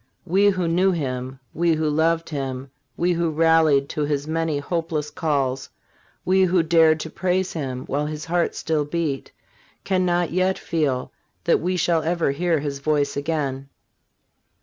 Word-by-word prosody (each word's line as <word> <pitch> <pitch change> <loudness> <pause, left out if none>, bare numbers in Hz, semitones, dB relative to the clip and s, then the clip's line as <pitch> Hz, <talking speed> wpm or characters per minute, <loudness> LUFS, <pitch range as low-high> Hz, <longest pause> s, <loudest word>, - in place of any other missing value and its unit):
We 195 +3 +4
who 185 -3 0
knew 180 +3 +3
him, 130 -5 -3
we 170 +1 +2
who 155 0 0
loved 160 +2 +1
him, 135 -2 -4 0.3
we 175 +1 +2
who 170 -1 0
rallied 160 -3 +3
to 150 - -3
his 145 0 -1
many 165 -1 -1
hopeless 155 0 -3
calls, 135 -4 -1 0.6
we 190 +1 +3
who 180 -2 +3
dared 160 -1 +4
to 160 - -6
praise 185 +1 -1
him 130 -5 -4
while 145 +2 -1
his 155 0 -5
heart 175 0 0
still 155 -2 0
beat, 150 -3 -3 0.5
can 185 -1 +1
not 175 -1 +1
yet 185 +2 +1
feel 145 -6 -1 0.3
that 170 - +3
we 180 +2 -1
shall 170 -1 +2
never 165 -2 0
hear 165 +1 0
his 140 -1 -4
voice 145 0 0
again. 140 -2 -2
160 Hz, 160 wpm, -23 LUFS, 145-170 Hz, 0.6 s, We